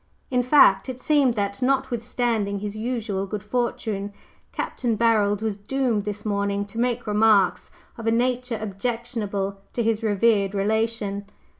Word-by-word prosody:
In 250 Hz, -1 st, +3 dB
fact, 245 Hz, -5 st, +5 dB
it 255 Hz, -1 st, -5 dB
seemed 275 Hz, -4 st, +3 dB
that, 200 Hz, +1 st, -2 dB
notwithstanding 240 Hz, -5 st, 0 dB
his 205 Hz, +1 st, -5 dB
usual 215 Hz, -4 st, -2 dB
good 210 Hz, 0 st, -5 dB
fortune, 210 Hz, -3 st, -2 dB, 0.4 s
Capt. -, -, -5 dB, 0.2 s
Barold 215 Hz, -2 st, +2 dB
was 215 Hz, -3 st, -1 dB
doomed 225 Hz, 0 st, -1 dB
this 210 Hz, 0 st, -5 dB
morning 200 Hz, -1 st, 0 dB
to 205 Hz, +3 st, -8 dB
make 245 Hz, 0 st, 0 dB
remarks 210 Hz, -3 st, +3 dB, 0.3 s
of 225 Hz, -, -5 dB
a -, -, +4 dB
nature 250 Hz, 0 st, 0 dB
objectionable 210 Hz, -2 st, -3 dB
to 235 Hz, -, 0 dB
his 225 Hz, 0 st, +1 dB
revered 205 Hz, -2 st, +2 dB
relation. 205 Hz, -1 st, -1 dB
220 Hz, 140 wpm, -24 LUFS, 200-240 Hz, 0.4 s, fact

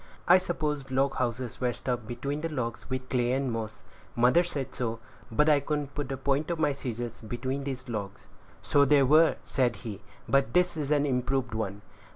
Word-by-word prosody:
"I 180 Hz, +2 st, +8 dB
supposed 150 Hz, -6 st, -2 dB
log 135 Hz, +1 st, +1 dB
houses 125 Hz, -1 st, -2 dB
were 125 Hz, -1 st, +1 dB
stuffed 120 Hz, 0 st, -3 dB
between 140 Hz, +5 st, -3 dB
the 165 Hz, -, -2 dB
logs 125 Hz, -6 st, -4 dB
with 130 Hz, 0 st, -3 dB
clay 125 Hz, -1 st, +1 dB
and 135 Hz, -1 st, 0 dB
moss; 110 Hz, -2 st, -5 dB, 0.3 s
mother 125 Hz, +9 st, +5 dB
said 145 Hz, -6 st, -4 dB
so; 115 Hz, -3 st, -2 dB, 0.3 s
but 150 Hz, +7 st, +3 dB
I 150 Hz, -2 st, +6 dB
couldn't 145 Hz, -1 st, -3 dB
put 145 Hz, -3 st, -3 dB
the 135 Hz, -, -3 dB
point 140 Hz, +4 st, 0 dB
of 170 Hz, -, -1 dB
my 150 Hz, -2 st, +2 dB
scissors 120 Hz, -4 st, -5 dB
between 130 Hz, +5 st, -3 dB
these 130 Hz, -2 st, -5 dB
logs." 105 Hz, -4 st, -5 dB, 0.4 s
"So 145 Hz, -, +4 dB
they 140 Hz, 0 st, +5 dB
were," 155 Hz, +4 st, +5 dB
said 125 Hz, -3 st, +1 dB
he; 105 Hz, -2 st, -5 dB, 0.3 s
"but 140 Hz, +3 st, +2 dB
this 180 Hz, -1 st, +3 dB
is 150 Hz, -3 st, -3 dB
an 145 Hz, -1 st, +3 dB
improved 125 Hz, -2 st, 0 dB
one. 105 Hz, -2 st, -3 dB
135 Hz, 195 wpm, -28 LUFS, 120-145 Hz, 0.4 s, I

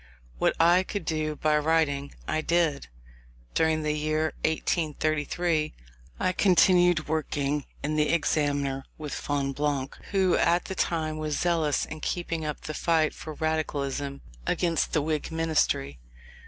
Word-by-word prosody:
What -, -, +2 dB
I 170 Hz, +2 st, +6 dB
could 190 Hz, -1 st, -5 dB
do 155 Hz, -1 st, -1 dB
by 150 Hz, 0 st, +2 dB
writing, 150 Hz, -3 st, +1 dB
I 155 Hz, -, 0 dB
did. 165 Hz, -3 st, +1 dB, 0.7 s
During 160 Hz, -1 st, +2 dB
the 150 Hz, 0 st, +1 dB
year 155 Hz, 0 st, 0 dB
1833 155 Hz, 0 st, 0 dB, 0.4 s
I 185 Hz, -, +2 dB
continued 180 Hz, -3 st, +4 dB
working 150 Hz, -2 st, -1 dB, 0.2 s
in 155 Hz, +1 st, -1 dB
the 150 Hz, 0 st, +2 dB
Examiner 145 Hz, -4 st, 0 dB
with 150 Hz, -2 st, -6 dB
Fonblanque 140 Hz, -1 st, -2 dB
who 190 Hz, -2 st, +3 dB
at 175 Hz, +1 st, +2 dB
that 190 Hz, -, -6 dB
time 155 Hz, -2 st, 0 dB
was 155 Hz, -1 st, -2 dB
zealous 165 Hz, -4 st, +1 dB
in 155 Hz, -, -8 dB
keeping 170 Hz, -1 st, -2 dB
up 150 Hz, -1 st, -4 dB
the 155 Hz, -, -5 dB
fight 160 Hz, -1 st, +2 dB
for 155 Hz, -1 st, -8 dB
Radicalism 145 Hz, -3 st, -2 dB, 0.3 s
against 170 Hz, -2 st, +1 dB
the 150 Hz, -, +2 dB
Whig 155 Hz, +1 st, -2 dB
ministry. 155 Hz, -, 0 dB
155 Hz, 135 wpm, -27 LUFS, 150-165 Hz, 0.7 s, I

